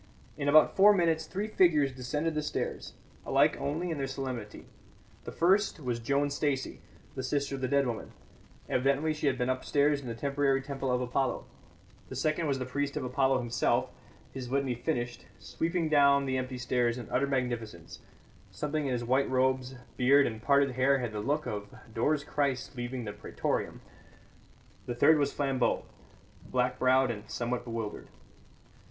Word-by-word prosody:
In 145 -1 -1
about 155 +2 +6
four 205 +2 +7
minutes 165 -3 +1
three 200 +3 -3
figures 165 -9 +3
descended 150 +6 -2
the 155 - -1
stairs, 150 - -4 0.3
alike - - +3
only 165 +5 -2
in 155 - -3
their 135 - -1
solemnity. 130 -5 -6 0.6
The - - -5
first 190 +2 +2
was 125 -5 -2
Joan 140 +4 0
Stacey, 140 -2 -2 0.3
the - - -4
sister 140 +2 -1
of 135 - -4
the 130 - 0
dead 140 +1 +2
woman 120 -3 -4 0.6
evidently 140 +4 +1
she 150 -1 -2
had 130 -2 +1
been 125 -1 0
upstairs 140 +3 +1
in 130 - -9
the 115 - -4
temporary 140 +1 +1
temple 135 -1 -3
of 125 0 +1
Apollo; 125 +1 -1 0.6
the - - -7
second 155 +1 0
was 140 -2 0
the 130 - -3
priest 140 +3 -2
of 145 - -2
Apollo 130 +1 +1
himself, 120 0 0 0.4
his 130 -2 -6
litany 135 -1 0
finished, 120 -2 -3
sweeping 170 0 -2
down 140 -2 +4
the 130 -1 -1
empty 130 0 -4
stairs 120 -1 0
in 120 - -7
utter 135 +3 +1
magnificence 120 -10 -3 0.5
something 150 -1 -2
in 130 - 0
his 120 -1 -2
white 130 +3 +2
robes, 130 0 +1 0.2
beard 135 +2 +5
and 110 -1 -4
parted 140 +1 +3
hair 130 +2 +3
had 120 -3 -3
the 105 - -4
look 145 +8 -1
of 105 -4 -4 0.3
Dore's 145 +6 +1
Christ 140 -2 -2
leaving 120 0 -4
the 105 - -5
Pretorium; 105 - -3 1.1
the 120 - -3
third 155 +5 +5
was 140 - +1
Flambeau, 135 -3 0 0.6
black 125 0 0
browed 130 0 +4
and 105 -2 -8
somewhat 120 +1 -2
bewildered. 115 -3 -5
135 Hz, 170 wpm, -30 LUFS, 125-145 Hz, 1.1 s, four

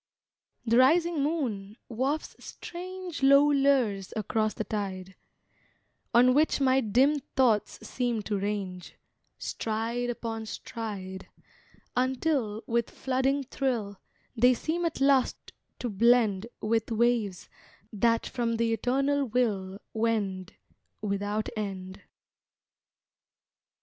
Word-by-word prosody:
The 230 +1 +4
rising 330 +4 +4
moon 240 -10 -2
wafts 265 +6 -2
strange 365 -2 -7
Low 280 +2 +6
lures 260 -9 +2
across 215 0 0
the 220 - -2
tide, 190 -3 -4 1.0
On 250 +2 +6
which 300 +2 +3
my 265 -1 +3
dim 260 +7 +3 0.2
thoughts 235 -6 +1
seem 240 -4 -1
to 205 -1 -2
range, 195 -3 -4 0.4
Stride 230 +2 -2
Upon 225 -2 -4
stride, 195 -5 -6 0.7
Until, 255 -4 0
with 235 0 0
flooding 265 +2 0
thrill, 240 -7 -2 0.4
They 250 +2 +5
seem 340 +7 -2
at 325 -4 -2
last 275 -2 +3 0.4
to 245 - -3
blend 225 -1 +3
With 225 +1 0
waves 225 -4 0 0.5
that 230 +2 +2
from 230 -2 -1
the 230 0 +1
Eternal 275 +5 +1
Will 205 -6 -1
Wend, 210 -5 -1 0.5
Without 205 +1 -1
end. 190 -3 -5
230 Hz, 105 wpm, -28 LUFS, 210-265 Hz, 1.0 s, Low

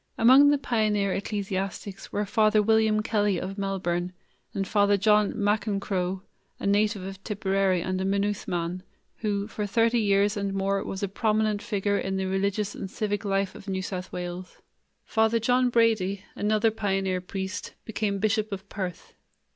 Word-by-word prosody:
Among 260 +5 +7
the 290 - +4
pioneer 215 -6 +1
ecclesiastics 195 -1 -4
were 210 - -1
Father 215 0 +3
William 215 0 +3
Kelly 205 -4 +1
of 195 +2 -5
Melbourne 180 -2 -2 0.4
and 195 -1 -2
Father 205 0 +3
John 210 +1 +3
McEncroe, 200 -3 -1 0.4
a - - -5
native 205 0 +2
of 195 0 -8
Tipperary 195 -3 0
and 185 0 -2
a - - 0
Maynooth 200 +1 0
man, 175 +1 -2 0.4
who 205 -2 -1
for 210 -2 -4
thirty 230 +3 +2
years 200 0 +2
and 200 -1 -2
more 195 0 0
was 190 +1 -5
a - - +1
prominent 215 +1 0
figure 205 -3 0
in 190 0 -2
the 190 - -1
religious 200 +2 -1
and 195 - -6
civic 205 0 -2
life 195 -1 0
of 200 - -12
New 190 -1 -2
South 185 -1 -5
Wales. 180 +1 -6 0.5
Father 220 +1 +2
John 250 +2 +2
Brady, 215 -5 +2
another 215 +2 +2
pioneer 195 -3 -1
priest, 190 +2 -5
became 210 -2 -1
Bishop 215 +1 0
of 195 0 -6
Perth. 185 -4 -6
200 Hz, 160 wpm, -26 LUFS, 190-215 Hz, 0.5 s, Among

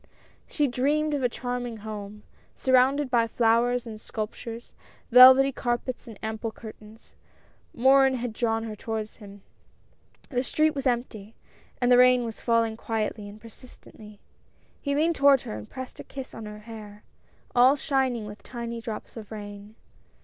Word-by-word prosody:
She 295 - 0
dreamed 290 +4 0
of 285 - -1
a 250 - +2
charming 245 -1 -4
home, 210 -1 -7 0.3
surrounded 260 +1 +2
by 230 -2 +3
flowers 235 +2 +2
and 220 -2 -9
sculptures; 230 +1 -7 0.4
velvety 260 +2 +9
carpets 245 0 -3
and 225 -3 -10
ample 220 +1 -3
curtains. 220 0 -13 0.6
Morin 265 +2 +4
had 245 -2 -4
drawn 225 0 -1
her 220 -2 -6
toward 220 0 -4
him. 200 -2 -14 0.9
The 250 -3 0
street 310 +4 +1
was 275 -2 -2
empty, 230 -4 -3 0.4
and 245 0 +2
the 245 - +7
rain 250 -1 +5
was 225 -1 -7
falling 230 -2 +1
quietly 215 -2 -3
and 205 +1 -12
persistently. 215 -2 -15 0.6
He 280 -1 -1
leaned 320 +3 +1
toward 280 -2 +5
her - - -6
and 105 0 -9
pressed 260 0 -8
a - - -6
kiss 270 -1 -9
on 225 -1 -8
her 210 0 -9
hair, 210 -2 -11 0.5
all 250 +3 +6
shining 265 -6 -1
with 210 +1 -10
tiny 235 -1 -6
drops 220 -2 -7
of 220 -2 -10
rain. 205 0 -9
235 Hz, 155 wpm, -26 LUFS, 220-255 Hz, 0.9 s, velvety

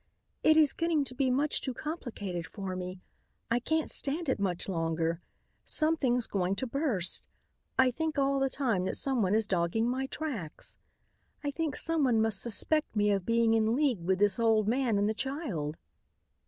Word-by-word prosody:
"It 315 0 +5
is 305 -3 +5
getting 330 -3 +1
to 255 - -5
be 260 0 +1
much 280 +4 +1
too 260 -3 -4
complicated 220 - -5
for 195 -3 -5
me. 180 0 -6 0.5
I 235 - +3
can't 315 +5 0
stand 300 +2 -1
it 260 - 0
much 185 -3 -1
longer. 165 -1 -1 0.4
Something's 275 -7 +1
going 190 -1 -1
to 260 - -3
burst. 250 - -1 0.6
I 260 -1 +5
think 315 +4 -3
all 275 0 +2
the 270 0 +1
time 235 -10 0
that - - -1
someone 225 -8 +1
is 220 0 +2
dogging 190 +4 0
my 260 +2 -1
tracks. 255 - -6 0.6
I 290 - -1
think 310 -1 -2
someone 280 -9 +2
must 220 -3 +3
suspect 295 +5 +1
me 210 0 +3
of 195 -3 -1
being 230 -1 +3
in 225 +1 +2
league 265 - +1
with 185 +2 +1
this 205 +2 +3
old 220 -2 +3
man 240 -2 +1
and 205 +1 +2
the 215 - +1
child." 220 - -3
235 Hz, 175 wpm, -30 LUFS, 195-275 Hz, 0.6 s, It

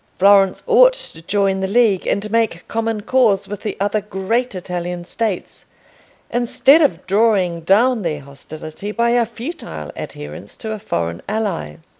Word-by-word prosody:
Florence 195 0 +4
ought - - +6
to 165 - -8
join 195 +2 0
the 190 - -1
League 210 -2 +2
and 205 +1 -1
make 225 -7 0
common 225 -1 -2
cause 220 -4 +2
with 205 -1 -6
the 215 - -4
other 205 +2 0
great 210 +4 -2
Italian 175 -1 -4
States, 210 -1 -4 0.7
instead 255 +5 +4
of 230 - +1
drawing 195 -4 +2
down 225 +7 +3
their 155 -5 -3
hostility 155 +7 -8
by 235 +2 +1
a 240 -1 +2
futile 230 - -7
adherence 75 +7 -8
to 220 - -5
a 215 - -4
foreign 85 - -3
ally. 200 - -2
205 Hz, 150 wpm, -19 LUFS, 175-230 Hz, 0.7 s, ought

